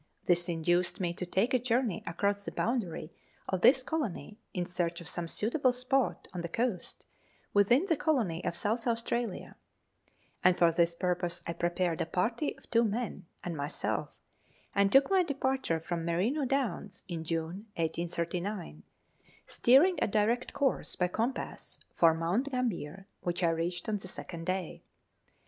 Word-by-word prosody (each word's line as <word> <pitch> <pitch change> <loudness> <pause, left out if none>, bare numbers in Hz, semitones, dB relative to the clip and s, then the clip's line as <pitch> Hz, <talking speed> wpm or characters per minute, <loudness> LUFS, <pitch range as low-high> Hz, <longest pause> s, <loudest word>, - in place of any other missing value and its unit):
This 175 0 +3
induced 175 +2 +1
me 175 -2 0
to 180 +1 -5
take 200 +8 +1
a 255 - +4
journey 240 -4 0
across 200 +3 0
the - - -5
boundary 195 -9 -2 0.3
of 185 -1 -1
this 255 +2 +6
colony 250 - -3
in 180 -2 -2
search 175 -1 -2
of 170 - -8
some 170 +1 -3
suitable 250 - +1
spot 255 +1 0
on 180 - -3
the 170 - -4
coast 225 -3 -2 0.5
within 235 - +5
the 340 -4 +2
colony 235 - 0
of - - -1
South 225 +6 -1
Australia; 235 -2 -2 0.9
and 180 0 +5
for 170 -1 +5
this 170 0 +2
purpose 175 -1 -1
I 170 - -2
prepared 175 0 0
a - - -1
party 230 - -1
of - - -20
two 230 0 +5
men 220 -4 -2 0.2
and 175 -2 -3
myself, 145 +2 -2 0.6
and 200 0 +3
took 275 +6 +5
my 380 -1 +5
departure 265 - 0
from 165 +1 -3
Merino 200 - +1
Downs 235 -7 -2
in 170 -3 -4
June 165 +6 -3
1839, 170 - -2 0.6
steering 295 +10 +5
a - - +3
direct 220 +4 +1
course 275 -3 0
by 180 -1 +1
compass 230 +8 -3 0.2
for 165 -1 +5
Mount 180 +12 0
Gambler, 195 - -2
which 175 +1 -2
I 170 - +4
reached 175 +4 -2
on 215 -1 0
the 190 - -8
second 170 -2 -6
day. 185 -2 -2
190 Hz, 160 wpm, -31 LUFS, 170-240 Hz, 0.9 s, this